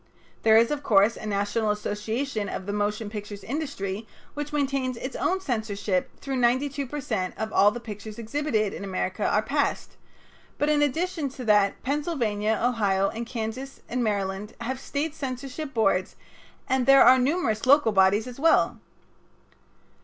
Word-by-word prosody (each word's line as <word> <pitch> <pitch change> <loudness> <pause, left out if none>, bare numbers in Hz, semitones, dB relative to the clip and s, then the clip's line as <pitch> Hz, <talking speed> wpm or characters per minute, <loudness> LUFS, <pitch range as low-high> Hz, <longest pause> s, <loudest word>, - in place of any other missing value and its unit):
There 220 0 +6
is, 230 +3 +4
of 295 -1 -1
course, 210 -2 +4
a 215 - -7
National 205 +2 0
Association 210 +3 -2
of 185 - -5
the 205 - -3
Motion 210 +1 -1
Picture 205 -1 -6
Industry 225 -7 -4 0.3
which 295 0 -5
maintains 275 -3 -1
its 260 +3 -6
own 375 +1 0
censorship 215 - -1
through 270 -1 -3
which - - 0
92 270 +3 +1
per 295 +4 -5
cent 185 -10 -3
of 220 0 -4
all 205 - +6
the 240 - -5
pictures 215 -2 -8
exhibited 230 -3 -1
in - - -6
America 190 -2 -2
are - - +2
passed, - - -1 0.6
but 295 - +1
in 300 -1 +3
addition 315 +1 0
to 255 -1 -8
that 205 -2 +3
Pennsylvania, 240 -8 0
Ohio, 200 -5 +2 0.2
Kansas, 250 +3 -5
and 250 0 -1
Maryland 200 -1 -2
have 260 +3 -3
State 290 +3 -3
censorship 275 +1 -5
boards, 195 -6 +1 0.5
and 260 -1 +1
there 275 -1 +8
are 255 +2 +7
numerous 255 -5 0
local 280 -4 +6
bodies 195 +2 +4
as 250 0 -9
well. 325 +3 +3
235 Hz, 160 wpm, -26 LUFS, 210-275 Hz, 0.6 s, there